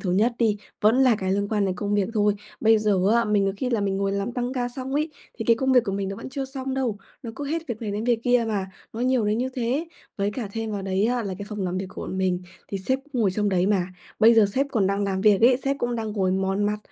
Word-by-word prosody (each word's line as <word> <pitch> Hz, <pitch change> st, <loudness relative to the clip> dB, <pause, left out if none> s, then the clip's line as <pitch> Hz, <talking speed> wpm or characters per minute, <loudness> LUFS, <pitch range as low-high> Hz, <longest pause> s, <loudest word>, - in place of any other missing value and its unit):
thứ 185 Hz, -, -2 dB
nhất 220 Hz, +6 st, +3 dB
đi, 220 Hz, -3 st, +2 dB, 0.2 s
vẫn 215 Hz, +3 st, +4 dB
là 250 Hz, -5 st, +5 dB
cái 190 Hz, -2 st, -1 dB
liên 200 Hz, +1 st, 0 dB
quan 210 Hz, -2 st, +1 dB
đến 185 Hz, -1 st, 0 dB
công 205 Hz, +2 st, -1 dB
việc 200 Hz, -2 st, +1 dB
thôi. 210 Hz, -1 st, +3 dB, 0.3 s
Bây 225 Hz, 0 st, +5 dB
giờ 210 Hz, -3 st, +2 dB
á, 235 Hz, 0 st, +3 dB
mình 210 Hz, -2 st, +2 dB
có 195 Hz, -, +1 dB
khi 255 Hz, +3 st, -2 dB
là 230 Hz, -4 st, +1 dB
mình 195 Hz, -1 st, 0 dB
ngồi 195 Hz, 0 st, 0 dB
làm 200 Hz, +4 st, -2 dB
tăng 245 Hz, 0 st, -2 dB
ca 245 Hz, -2 st, -1 dB
xong 260 Hz, +2 st, -5 dB
ấy, 305 Hz, +2 st, 0 dB, 0.3 s
thì 225 Hz, -, -3 dB
cái 230 Hz, 0 st, +4 dB
công 265 Hz, +1 st, +1 dB
việc 250 Hz, -2 st, +5 dB
của 195 Hz, -, -2 dB
mình 195 Hz, -1 st, -2 dB
nó 195 Hz, -, -5 dB
vẫn -, -, -7 dB
chưa 270 Hz, +1 st, -3 dB
xong 265 Hz, 0 st, -5 dB
đâu, 245 Hz, -6 st, -1 dB, 0.2 s
nó 230 Hz, -, -5 dB
cứ 290 Hz, -, -4 dB
hết 325 Hz, +3 st, -3 dB
việc 235 Hz, -3 st, -5 dB
này 215 Hz, -, -2 dB
đến 210 Hz, +2 st, -3 dB
việc 240 Hz, -2 st, +2 dB
kia 245 Hz, -1 st, +3 dB
mà, 195 Hz, -3 st, -2 dB, 0.2 s
nó 225 Hz, -, -6 dB
nhiều 250 Hz, -2 st, +2 dB
đến 210 Hz, +2 st, +1 dB
như 255 Hz, +2 st, 0 dB
thế. 260 Hz, +7 st, -1 dB, 0.3 s
Với 200 Hz, 0 st, 0 dB
cả 215 Hz, -2 st, -5 dB
thêm 225 Hz, -1 st, -3 dB
vào 200 Hz, -, -3 dB
đấy 190 Hz, +1 st, 0 dB
á, 245 Hz, -1 st, 0 dB
là 195 Hz, -2 st, -4 dB
cái 200 Hz, -, -6 dB
phòng 210 Hz, -2 st, -4 dB
làm 180 Hz, 0 st, -2 dB
việc 190 Hz, -, -3 dB
của -, -, -8 dB
bọn 190 Hz, -, -4 dB
mình 185 Hz, -1 st, 0 dB, 0.3 s
thì 195 Hz, -, -3 dB
sếp 260 Hz, +8 st, 0 dB
cũng 275 Hz, -5 st, -4 dB
ngồi 195 Hz, -, +3 dB
trong 210 Hz, +2 st, 0 dB
đấy 185 Hz, -1 st, +2 dB
mà, 190 Hz, -4 st, +2 dB, 0.3 s
bây 230 Hz, +2 st, +7 dB
giờ 220 Hz, -2 st, +6 dB
sếp 275 Hz, +2 st, +2 dB
còn 205 Hz, -6 st, +2 dB
đang 200 Hz, +1 st, 0 dB
làm 190 Hz, -1 st, -1 dB
việc 205 Hz, -1 st, +4 dB
ấy, 245 Hz, +2 st, +6 dB
sếp 275 Hz, 0 st, +1 dB
cũng 240 Hz, -2 st, -1 dB
đang 220 Hz, -2 st, -3 dB
ngồi 190 Hz, -3 st, +1 dB
mòn 195 Hz, +2 st, 0 dB
mặt 210 Hz, +1 st, 0 dB
215 Hz, 305 wpm, -24 LUFS, 195-245 Hz, 0.3 s, bây